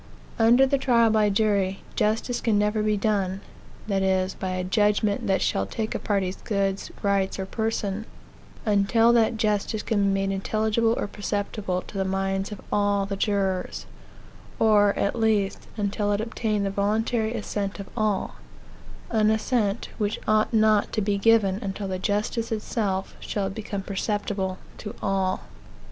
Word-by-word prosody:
Under 235 +4 +6
the 275 +1 +1
trial 235 -4 +4
by 215 -1 +3
jury, 200 -2 +1
justice 225 +3 0
can 220 -3 +2
never 210 +1 +1
be 210 0 +1
done 195 -2 0 0.4
that 195 -2 0
is, 190 0 +1
by 190 - -4
a 185 0 -2
judgment 205 +2 +1
that 190 - +2
shall 95 - 0
take 220 - -3
a - - -2
party's 195 -3 -1
goods, 195 -2 -1
rights, 200 -1 +1
or 190 - -3
person 220 0 -2 0.6
until 215 +3 +4
that 230 0 +3
justice 210 0 0
can 215 -3 0
be - - +3
made 195 0 0
intelligible 220 +3 +1
or - - -1
perceptible 205 -2 -3
to 195 - -7
the - - +2
minds 195 +1 -1
of 205 - -7
all 205 -1 +2
the 195 0 -3
jurors; 195 -2 -1 0.7
or, 205 -2 +4
at 200 - 0
least, 220 -4 0
until 205 0 0
it 205 - +1
obtain 220 -2 -1
the 195 - -1
voluntary 220 +3 0
assent 205 -2 -3
of 200 - -6
all 215 -4 -1 0.7
an 215 -2 +3
assent, 220 -1 0
which 210 +1 -1
ought 215 0 +3
not 215 -2 +3
to - - +1
be 200 0 0
given 205 -3 +4
until 195 0 -4
the 185 -1 -3
justice 210 +4 -1
itself 210 -3 -2
shall 205 - -3
have 195 0 -2
become 200 -2 -5
perceptible 195 -1 -2 0.2
to 215 +2 -7
all. 190 -1 0
205 Hz, 160 wpm, -25 LUFS, 195-220 Hz, 0.7 s, Under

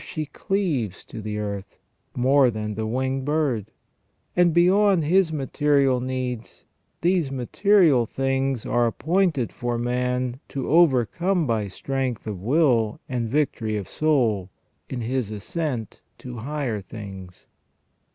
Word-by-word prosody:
she 155 -1 -4
cleaves 145 - -2
to 110 - -8
the 105 0 -4
earth, 100 -2 -5 0.4
more 130 +1 +5
than 105 -1 -3
the 110 +1 -3
winged 130 +3 -1
bird; 140 -8 0 0.7
and 175 -1 +4
beyond 185 +2 +4
his 175 +2 +3
material 140 -2 +2
needs, 125 -2 -4 0.4
these 175 -4 +2
material 135 - +3
things 135 -1 -1
are 120 0 +2
appointed 160 -1 +1
for 120 -1 -2
man 125 +1 -1
to 135 -2 -4
overcome 170 - +3
by 110 -5 0
strength 130 +4 -3
of 105 -5 -5
will 120 - +2
and 120 -3 -2
victory 115 -6 0
of 100 - -5
soul, 120 -11 +1 0.4
in 125 -2 -4
his 120 -1 -1
ascent 115 - -4 0.2
to 125 -1 -8
higher 125 -3 -3
things. 95 -3 -10
130 Hz, 125 wpm, -24 LUFS, 110-150 Hz, 0.7 s, more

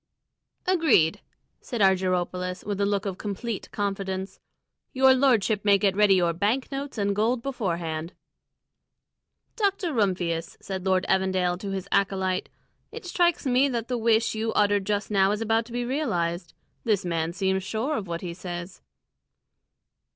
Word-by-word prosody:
"Agreed!" 320 - +3 0.4
said 240 - -5
Argyropoulos, 185 -1 +1
with 205 -1 -2
a 200 - +2
look 200 -1 0
of 195 -1 -4
complete 210 +1 -4
confidence. 195 -2 -3 0.5
"Your 265 -1 +6
lordship 235 -6 +2
may 200 -1 +5
get 195 -1 +1
ready 205 -1 +5
your 175 -2 +2
bank 215 - 0
notes 275 -1 -5
and 200 -1 0
gold 230 +3 +1
beforehand." 170 -10 -3 1.4
"Dr. 395 -5 0
Rumphius," 180 -7 -1
said 190 -1 -5
Lord 185 0 +2
Evandale 185 -2 +1
to 200 - -5
his 195 0 -4
acolyte, 190 -1 0 0.4
"it 450 -2 -9
strikes 345 -3 +1
me 260 +2 +3
that 235 -2 -3
the 250 - 0
wish 225 0 +2
you 220 +1 -1
uttered 205 -1 +2
just 210 +1 -1
now 195 -1 +4
is 210 - -2
about 225 +1 +1
to - - -13
be 245 0 -2
realised. 175 - -2 0.3
This 205 -4 +1
man 165 -1 -1
seems 190 +1 0
sure 225 +9 -2
of 205 -7 -4
what 170 0 -4
he 175 -2 -5
says." 175 0 -7
200 Hz, 150 wpm, -26 LUFS, 185-235 Hz, 1.4 s, Your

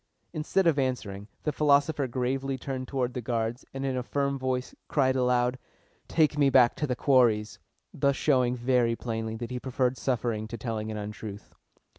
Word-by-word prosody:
Instead 160 +5 +1
of 160 -4 +3
answering, 105 -7 -2 0.2
the 150 - 0
philosopher 145 -1 +2
gravely 130 +2 -1
turned 130 0 -5
toward 125 -3 -1
the 125 - -3
guards, 115 +1 -2
and 135 0 -4
in 135 -1 -1
a 125 - -1
firm 140 +2 -1
voice 130 -1 -2
cried 130 -3 +2
aloud, 125 0 +2 0.5
"Take 155 -2 +2
me 140 -1 +5
back 125 -3 +5
to 150 - -1
The 125 - -1
Quarries!" 120 -6 +3 0.3
thus 140 -1 +2
showing 125 -5 +2
very 120 -1 +2
plainly 110 -2 -4
that 120 +2 -6
he 125 - -3
preferred 130 0 0
suffering 115 -4 -1
to 115 - -6
telling 110 -1 -3
an 110 - -4
untruth. 105 0 -7
125 Hz, 175 wpm, -28 LUFS, 115-135 Hz, 0.5 s, me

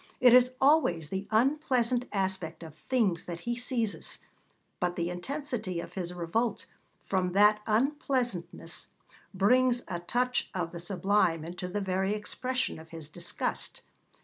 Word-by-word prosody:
It 250 -1 +7
is 250 0 +6
always 260 - +3
the 190 +3 -3
unpleasant 250 0 +2
aspect 190 -5 -2
of 160 -2 -9 0.2
things 220 -10 +2
that 170 -1 -6
he 240 +4 -2
seizes, 235 -3 -1 0.6
but 180 -1 0
the 170 0 -1
intensity 220 - -3
of - - -7
his 180 -2 -3
revolt 200 +6 -1 0.4
from 185 -2 0
that 210 +2 +5
unpleasantness 240 - -1 0.4
brings 245 +5 +3
a 175 - -3
touch 250 +8 0
of 170 -3 -2
the 170 - -6
sublime 175 -2 +1
into 180 +2 -5
the 205 +3 -2
very 190 +1 0
expression 255 +2 -2
of 160 0 -13
his 160 -2 -8
disgust. - - -3
200 Hz, 140 wpm, -30 LUFS, 175-250 Hz, 0.6 s, It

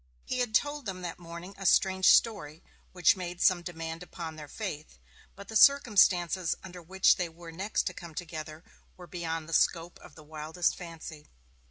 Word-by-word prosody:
He 255 - -3
had 240 -3 -1
told 290 -2 0
them 185 -1 -5
that 175 -1 -6
morning 170 +2 -9
a 195 - -7
strange 190 0 +3
story, 170 -9 +3 0.3
which 180 0 +4
made 180 -2 -6
some 180 -1 +4
demand 165 -1 -6
upon 170 -2 -7
their 150 -1 -9
faith, 160 -5 -7 0.4
but 200 0 -11
the 220 - -8
circumstances 190 - +4
under 180 -1 -10
which 190 +3 +3
they 180 -2 -2
were 165 0 -12
next 190 +6 -2
to - - -3
come 170 -3 -11
together 160 -2 -7 0.3
were 180 - -11
beyond 165 -3 -5
the 165 - -7
scope 170 +2 +1
of - - -15
the 155 - -14
wildest 155 +3 -2
fancy. 165 -3 -10
175 Hz, 180 wpm, -29 LUFS, 165-190 Hz, 0.4 s, which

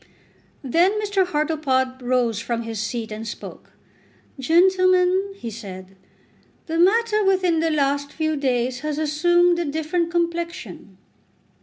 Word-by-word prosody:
Then 350 - +2
Mr. 405 -3 0
Hartlepod 295 -5 -1
rose 245 -3 0
from 235 0 -3
his 225 -2 -5
seat 220 +1 -4
and 220 +1 -6
spoke. - - -9 0.7
"Gentlemen," 370 +4 +3
he 235 - -7
said, 195 -3 -10 0.7
"the 325 0 -2
matter 425 +3 +3
within 370 -4 +2
the 325 0 +1
last 285 -1 0
few 315 -1 -1
days 250 -3 -1
has 300 +1 -3
assumed 345 +3 +2
a 345 - -1
different 320 +3 -1
complexion." 335 - -4
310 Hz, 125 wpm, -22 LUFS, 250-355 Hz, 0.7 s, Gentlemen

